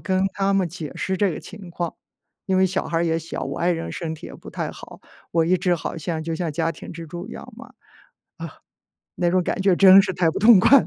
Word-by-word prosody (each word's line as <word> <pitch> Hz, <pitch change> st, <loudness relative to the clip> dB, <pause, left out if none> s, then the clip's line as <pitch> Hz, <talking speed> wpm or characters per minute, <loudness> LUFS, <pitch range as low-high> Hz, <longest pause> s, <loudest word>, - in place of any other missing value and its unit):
跟 185 Hz, -1 st, 0 dB
他 195 Hz, 0 st, +1 dB
们 195 Hz, -3 st, +1 dB
解 160 Hz, -3 st, -7 dB
释 190 Hz, -, -2 dB
这 200 Hz, +1 st, +2 dB
个 -, -, -6 dB
情 195 Hz, -4 st, -11 dB
况， 170 Hz, -1 st, -4 dB, 0.5 s
因 190 Hz, -1 st, +1 dB
为 190 Hz, -, +5 dB
小 190 Hz, +1 st, -2 dB
孩 165 Hz, -, -1 dB
儿 170 Hz, -, +1 dB
也 165 Hz, -1 st, +1 dB
小， 165 Hz, 0 st, -6 dB
我 -, -, -5 dB
爱 175 Hz, -, +2 dB
人 165 Hz, -1 st, -2 dB
身 160 Hz, -2 st, -4 dB
体 -, -, -10 dB
也 -, -, -10 dB
不 -, -, -11 dB
太 -, -, -3 dB
好， -, -, -12 dB, 0.3 s
我 165 Hz, -1 st, +2 dB
一 185 Hz, -, +3 dB
直 180 Hz, 0 st, +1 dB
好 165 Hz, -, -5 dB
像 160 Hz, 0 st, -3 dB
就 165 Hz, +1 st, -3 dB
像 165 Hz, -1 st, -3 dB
家 165 Hz, +2 st, 0 dB
庭 -, -, -9 dB
支 165 Hz, 0 st, -8 dB
柱 175 Hz, +4 st, -7 dB
一 -, -, -10 dB
样 255 Hz, -, -9 dB
嘛。 265 Hz, +3 st, -10 dB
啊， -, -, -22 dB, 1.4 s
那 175 Hz, -1 st, +1 dB
种 185 Hz, +1 st, +2 dB
感 185 Hz, -, -2 dB
觉 195 Hz, -2 st, +4 dB
真 195 Hz, +1 st, +8 dB
是 190 Hz, -1 st, -2 dB
太 175 Hz, -2 st, +1 dB
不 -, -, -4 dB
痛 215 Hz, -2 st, +7 dB
快 275 Hz, +7 st, +7 dB
了。 -, -, -6 dB
180 Hz, 280 characters per minute, -23 LUFS, 165-190 Hz, 1.4 s, 真